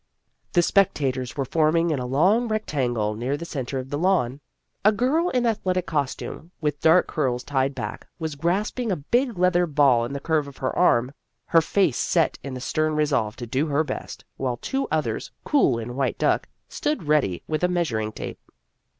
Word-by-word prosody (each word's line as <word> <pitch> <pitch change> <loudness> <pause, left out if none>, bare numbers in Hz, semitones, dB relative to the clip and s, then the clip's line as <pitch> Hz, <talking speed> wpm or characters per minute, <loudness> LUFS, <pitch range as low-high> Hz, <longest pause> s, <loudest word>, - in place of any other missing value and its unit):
The 175 - +4
spectators 135 - +1
were 135 - 0
forming 165 +4 +2
in 145 - 0
a 125 - -3
long 190 - +3
rectangle 125 - -1
near 125 +6 -2
the 170 - -6
centre 135 -4 -4
of 130 0 -6
the 145 - -1
lawn. 155 -8 +1 0.4
A 210 - +6
girl 270 - +1
in 250 -5 +1
athletic 185 -5 0
costume, 155 +1 -3
with 145 -2 -2
dark 165 +3 +5
curls 125 -6 -1
tied 135 -1 0
back, - - -6
was 160 -2 -3
grasping 200 - -1
a - - +2
big 235 - 0
leather 180 -1 +3
ball 140 -6 +4
in 120 +4 -4
the 140 - -3
curve 155 0 0
of 140 - -11
her 130 - -2
arm, 125 -8 +3 0.3
her 165 - +4
face 170 -5 +1
set 165 -3 +1
in 135 -2 -5
the - - -5
stern 155 +3 0
resolve 140 -8 +1
to 120 - -6
do 130 +7 0
her 145 +1 +2
best, 150 - -6
while 125 -2 -2
two 270 - -2
others, - - -1
cool 260 - +3
in 120 +2 -5
white 135 -1 -1
duck, - - +1 0.2
stood 300 - -2
ready 145 - +1
with 155 +2 -2
a - - +5
measuring 125 -12 -1
tape. - - -7
150 Hz, 190 wpm, -24 LUFS, 130-180 Hz, 0.4 s, A